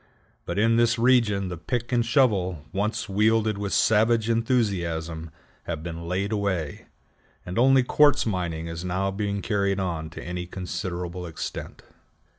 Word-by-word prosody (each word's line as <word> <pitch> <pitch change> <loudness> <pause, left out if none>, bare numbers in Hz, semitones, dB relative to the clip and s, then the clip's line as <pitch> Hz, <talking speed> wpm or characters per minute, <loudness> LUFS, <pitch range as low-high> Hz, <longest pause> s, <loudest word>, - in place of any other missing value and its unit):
But - - -3
in 115 +2 +3
this 115 0 +3
region 115 -6 +3
the 90 - -5
pick 120 +8 -3
and 120 -1 +3
shovel, 100 - +1
once 105 +4 -1
wielded 110 +1 +2
with 100 -1 -3
savage 110 +1 +3
enthusiasm, 85 -9 -1 0.4
have 80 -2 -4
been 85 0 -6
laid 95 +4 -1
away, 95 -8 -2 0.6
and 90 +5 -3
only 130 +1 +5
quartz 145 +3 +4
mining 85 -6 -2
is 85 +1 -5
now 95 +2 -1
being 100 0 -2
carried 100 -2 0
on 85 -4 -3
to 80 - -9
any 90 0 -5
considerable 90 -1 -5
extent. 80 - -6
100 Hz, 145 wpm, -25 LUFS, 90-115 Hz, 0.6 s, only